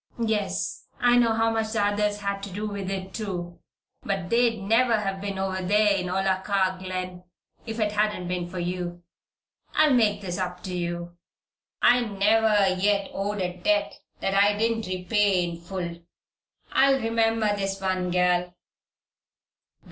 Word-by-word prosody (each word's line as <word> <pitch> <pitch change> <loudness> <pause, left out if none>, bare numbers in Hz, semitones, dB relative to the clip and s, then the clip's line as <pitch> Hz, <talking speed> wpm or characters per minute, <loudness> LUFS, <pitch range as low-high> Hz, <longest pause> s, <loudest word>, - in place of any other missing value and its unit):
Yes! 215 -2 -2
I 245 0 +4
know 235 -2 +3
how 225 0 +2
much 220 -1 -1
the 210 -3 +2
others 205 0 0
had 200 0 -2
to 200 - -6
do 205 +3 -4
with 200 -2 -4
it, 190 -1 -5
too. 175 -5 -5 0.4
But 195 -3 -3
they'd 235 -1 +3
never 225 +4 +3 0.2
been 200 -1 -4
over 190 0 -2
there 205 +2 +3
in 185 -2 -2
Olakah 190 0 0
Glen 185 -1 -5 0.4
if 225 +1 -4
it 210 -1 +1
hadn't 210 -3 0
been 180 -1 -3
for 185 - -7
you. 175 0 -4 0.7
I'll 305 -3 +5
make 215 -5 +3
this 180 -2 -4
up 180 -1 -4
to 185 -1 -4
you. 175 0 -4 0.7
I 245 +1 +6
never 210 -1 +3
yet 200 -1 +1
owed 200 +1 -2
a 180 -1 -3
debt 205 +2 +1 0.3
that 195 - 0
I 205 +1 +4
didn't 225 0 0
repay 185 +1 +1
in 170 0 -7
full. 170 -1 -5 0.7
I'll 270 0 +4
remember 225 -2 +1
this 195 -1 -2
one, 185 -1 -1
gal." 180 0 +1
195 Hz, 155 wpm, -26 LUFS, 180-215 Hz, 0.7 s, I